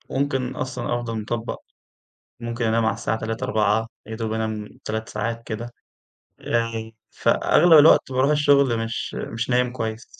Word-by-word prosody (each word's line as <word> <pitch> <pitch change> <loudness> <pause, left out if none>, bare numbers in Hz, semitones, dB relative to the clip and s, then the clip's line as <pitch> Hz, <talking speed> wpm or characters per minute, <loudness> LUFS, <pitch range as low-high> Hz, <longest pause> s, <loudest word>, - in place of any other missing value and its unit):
ممكن 135 -2 -1
أصلًا 130 -2 -3
أفضل 115 -2 -3
مِطَبق، 115 +2 -4 0.8
ممكن 120 0 -3
أنام 115 0 +2
على 110 - +2
الساعة 110 - -2
3:00 115 +2 -4
4:00 110 -2 +1 0.2
يا 110 +1 -6
دوب 110 -1 -3
أنام 110 -1 -3 0.2
3 110 +1 -4
ساعات 115 +2 -3
كده، 120 +2 -6 0.7
آآ 115 -1 -2 0.2
فأغلب 170 +2 +3
الوقت 150 -2 +6
باروح 130 +3 +2
الشغل 140 -5 +4
مش 115 0 -4
مش 120 +2 -4
نايم 125 0 +2
كويّس. 110 -2 -4
115 Hz, 145 wpm, -23 LUFS, 110-125 Hz, 0.8 s, الوقت